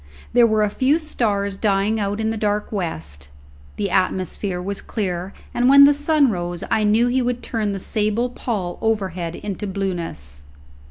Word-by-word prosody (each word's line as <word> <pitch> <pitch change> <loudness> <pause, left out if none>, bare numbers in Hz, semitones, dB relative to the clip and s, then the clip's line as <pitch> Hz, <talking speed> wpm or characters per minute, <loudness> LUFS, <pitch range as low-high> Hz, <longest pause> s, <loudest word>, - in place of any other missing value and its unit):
There 240 -1 +6
were 215 -1 +2
a 210 - +1
few 265 +7 +2
stars 205 -11 -1
dying 205 +1 +1
out 205 +1 -2
in 220 0 0
the - - -2
dark 210 -1 -1
west; 80 - -5 0.5
the 200 -2 -2
atmosphere 185 0 0
was 195 +2 -3
clear, 185 -3 -3 0.2
and 245 +1 +3
when 280 +1 +9
the 285 +1 +7
sun 290 -2 +3
rose 175 -2 -4
I 215 - +2
knew 215 +3 +4
he 250 +2 +1
would 245 0 -2
turn 220 -4 -1
the 195 - -3
sable 215 +5 -1
pall 200 -8 -4
overhead 185 -6 -1
into 205 0 -5
blueness. 170 - -4
205 Hz, 170 wpm, -21 LUFS, 185-230 Hz, 0.5 s, when